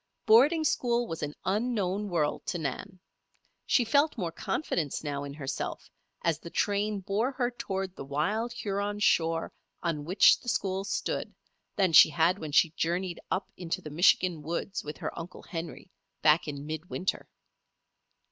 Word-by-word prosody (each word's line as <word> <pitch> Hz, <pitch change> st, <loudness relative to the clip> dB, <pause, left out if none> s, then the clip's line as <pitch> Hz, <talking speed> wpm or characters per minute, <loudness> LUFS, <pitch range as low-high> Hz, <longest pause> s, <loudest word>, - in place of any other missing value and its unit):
Boarding 275 Hz, +9 st, +6 dB
school 240 Hz, -5 st, +1 dB
was 165 Hz, -7 st, -6 dB
an 150 Hz, 0 st, -4 dB
unknown 205 Hz, -1 st, 0 dB
world 160 Hz, -4 st, 0 dB
to -, -, -1 dB
Nan. 170 Hz, +6 st, -5 dB, 0.7 s
She 245 Hz, -, +3 dB
felt 285 Hz, +6 st, +2 dB
more 175 Hz, -6 st, -2 dB
confidence 175 Hz, -, -2 dB
now 145 Hz, -2 st, -3 dB
in 140 Hz, 0 st, -7 dB
herself, 135 Hz, -3 st, -5 dB, 0.3 s
as 165 Hz, -2 st, +1 dB
the 170 Hz, -, -9 dB
train 205 Hz, +2 st, 0 dB
bore 210 Hz, +7 st, 0 dB
her 250 Hz, -2 st, 0 dB
toward 195 Hz, -6 st, -4 dB
the -, -, -7 dB
wild 195 Hz, -, -1 dB
Huron 205 Hz, -3 st, -2 dB
shore 165 Hz, -5 st, +2 dB, 0.3 s
on 165 Hz, -4 st, -1 dB
which 180 Hz, +6 st, +5 dB
the 245 Hz, -, -5 dB
school 195 Hz, -3 st, -1 dB
stood, -, -, -3 dB, 0.4 s
than 190 Hz, -4 st, +2 dB
she -, -, +9 dB
had 165 Hz, +5 st, +2 dB
when 155 Hz, -2 st, -6 dB
she 155 Hz, +2 st, +4 dB
journeyed 175 Hz, +2 st, -2 dB
up 190 Hz, -, -2 dB
into 170 Hz, -2 st, -3 dB
the 150 Hz, -, -9 dB
Michigan 175 Hz, 0 st, +3 dB
woods 170 Hz, +5 st, -3 dB
with 150 Hz, 0 st, -7 dB
her -, -, -5 dB
Uncle 170 Hz, +2 st, -8 dB
Henry, 170 Hz, +2 st, -7 dB, 0.3 s
back 155 Hz, +1 st, +4 dB
in 145 Hz, -1 st, -5 dB
mid 155 Hz, +3 st, -6 dB
winter. 190 Hz, -, -3 dB
180 Hz, 160 wpm, -29 LUFS, 160-210 Hz, 0.7 s, she